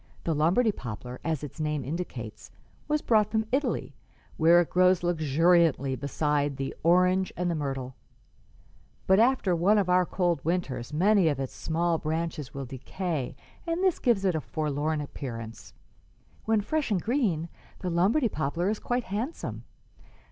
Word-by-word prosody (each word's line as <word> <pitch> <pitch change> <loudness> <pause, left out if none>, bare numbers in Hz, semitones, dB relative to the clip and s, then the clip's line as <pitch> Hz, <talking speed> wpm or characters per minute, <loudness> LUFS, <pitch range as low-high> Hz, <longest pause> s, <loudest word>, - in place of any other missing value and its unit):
The 165 - 0
Lombardy 175 +10 +3
poplar, 125 - -7
as 160 -3 -2
its 145 +2 -8
name 150 -2 -1
indicates, 130 -8 -6 0.4
was 300 0 0
brought 215 -2 +3
from 220 0 0
Italy, 275 +3 -1 0.4
where 165 +2 +6
it 175 - 0
grows 180 0 +4
luxuriantly 165 -3 +3
beside 145 +1 -1
the 135 -1 -3
orange 180 +2 +3
and 175 0 0
the - - -1
myrtle; 135 -3 -3 1.1
but 190 +1 +4
after 230 -6 +3
one 190 +6 +3
of 195 -3 +1
our 180 -1 +4
cold 175 -6 0
winters 155 -7 -2
many 190 +3 +3
of 145 -4 0
its 135 -1 -4
small 165 0 0
branches 160 -2 -3
will 135 -1 -5
decay, 135 +2 -4 0.3
and 335 +3 -1
this 375 -3 +2
gives 230 -6 +2
it 185 - +3
a 160 - -1
forlorn 150 0 -2
appearance. 115 -6 -7 0.7
When 220 -1 +2
fresh 305 +7 -1
and 200 -4 +1
green, 200 - 0 0.3
the 180 - -2
Lombardy 200 - +3
poplar 165 +3 -1
is 215 - -3
quite 245 0 -1
handsome. 225 - -4
170 Hz, 155 wpm, -28 LUFS, 145-195 Hz, 1.1 s, where